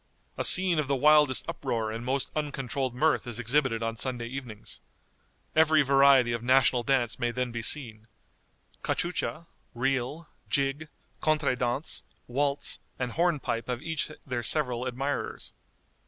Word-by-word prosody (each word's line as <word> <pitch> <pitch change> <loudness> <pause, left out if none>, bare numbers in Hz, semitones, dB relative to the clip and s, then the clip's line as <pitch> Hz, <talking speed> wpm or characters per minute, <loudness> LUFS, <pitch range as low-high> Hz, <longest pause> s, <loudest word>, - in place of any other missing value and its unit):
A - - -2
scene 180 -3 +7
of 150 - -1
the 140 - +1
wildest 150 -1 +4
uproar 110 -2 -2
and 115 +2 -5
most 130 +2 -1
uncontrolled 135 -3 -3
mirth 155 0 +1
is 120 -2 -3
exhibited 125 -1 +1
on 115 0 -2
Sunday 120 0 -2
evenings. 120 -4 -8 0.8
Every 155 -1 +5
variety 135 -3 +5
of 115 - -3
national 125 0 +4
dance 120 -2 0
may 120 - 0
then 125 +1 -2
be 120 0 -4
seen 115 -4 -2 0.7
cachucha, 170 -2 -2 0.3
reel, 135 +5 -2 0.2
jig, 140 +2 0 0.3
contré 155 -4 +1
dance, 125 +4 -3 0.2
waltz, 140 +3 -2 0.2
and 125 -1 -3
hornpipe 155 -7 -1
have 125 -1 -4
each 160 -2 -1 0.2
their 125 -3 -3
several 125 -1 0
admirers. 135 +3 -4
130 Hz, 140 wpm, -28 LUFS, 120-150 Hz, 0.8 s, scene